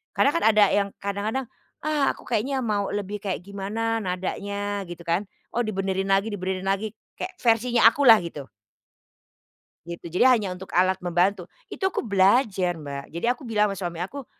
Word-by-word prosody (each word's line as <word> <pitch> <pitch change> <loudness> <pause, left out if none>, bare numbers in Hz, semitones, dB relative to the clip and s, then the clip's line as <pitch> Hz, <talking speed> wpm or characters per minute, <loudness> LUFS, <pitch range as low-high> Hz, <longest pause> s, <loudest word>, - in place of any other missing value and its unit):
Karena 280 - +4
kan 335 - 0
ada 215 -1 +6
yang 200 -1 +2 0.2
kadang-kadang, 210 +6 -2 0.4
"Ah 300 -2 +2
aku - - -15
kayaknya 260 +4 0
mau 205 -3 0
lebih 205 0 -3
kayak 190 -2 -2
gimana 210 +4 -2
nadanya," 200 +2 -3
gitu 175 0 -9
kan, 170 +5 +1 0.3
oh 240 - +2
dibenerin 195 -2 -2
lagi 195 +2 +3
dibenerin 190 -1 -3
lagi 200 +2 0 0.3
kayak 375 0 -5
versinya 235 0 +4
aku 285 - -1
lah 225 -2 +9
gitu. 145 -7 -7 1.4
Gitu 170 0 -7
jadi - - +6
hanya 210 -5 -1
untuk 180 +1 -8
alat 185 +1 +3
membantu, 180 +1 0 0.2
itu 380 - -2
aku 380 - -1
belajar 195 -3 +3
Mbak 140 -3 -7
jadi 170 - -2
aku 255 0 -11
bilang 210 -2 +2
ama 195 - -5
suami 175 -2 -4
aku, 270 +8 -6
200 Hz, 170 wpm, -25 LUFS, 185-225 Hz, 1.4 s, lah